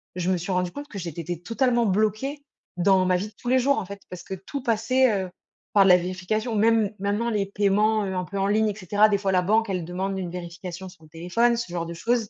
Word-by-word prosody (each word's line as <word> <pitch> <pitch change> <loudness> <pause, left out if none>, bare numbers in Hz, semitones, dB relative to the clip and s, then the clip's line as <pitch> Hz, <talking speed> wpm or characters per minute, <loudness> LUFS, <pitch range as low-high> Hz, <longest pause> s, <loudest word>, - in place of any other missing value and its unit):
je 180 0 0
me 185 - +2
suis 180 +3 -4
rendue 180 -1 0
compte 290 +6 -8
que 210 - -9
j'étais 170 -3 -5
té 175 +1 -4
totalement 235 +5 +1
bloquée 215 +8 0 0.4
dans 190 +1 +4
ma 185 0 +3
vie 185 +4 -2
de 215 - -15
tous - - -9
les 260 +1 +4
jours 280 +3 +2
en - - -2
fait, 200 +2 -9
parce 180 -1 -8
que - - -7
tout 195 +9 -6
passait, 235 +3 +2
heu, - - -9 0.4
par 200 -2 +6
la 180 -2 +7
vérification. 185 +6 -2
Même 220 -1 +3
maintenant 205 +4 -1
les 210 -3 0
paiements, 210 +2 +2
heu, 190 -1 -3
un 180 - -1
peu 200 +2 -5
en 195 - +1
ligne 215 +1 +2
et 205 - -4
cetera, 205 +2 +3
des 205 - +2
fois 195 -1 0
la 180 -1 +2
banque 220 +3 +2
elle 180 -3 -2
demande 190 +3 -3
une 180 -2 -4
vérification 180 +1 -7
sur 180 -3 -18
le 155 - -17
téléphone, 205 +9 +1
ce 235 -7 -4
genre 170 -1 -2
de 170 - -6
choses, 225 +5 -1
195 Hz, 260 wpm, -25 LUFS, 180-220 Hz, 0.4 s, la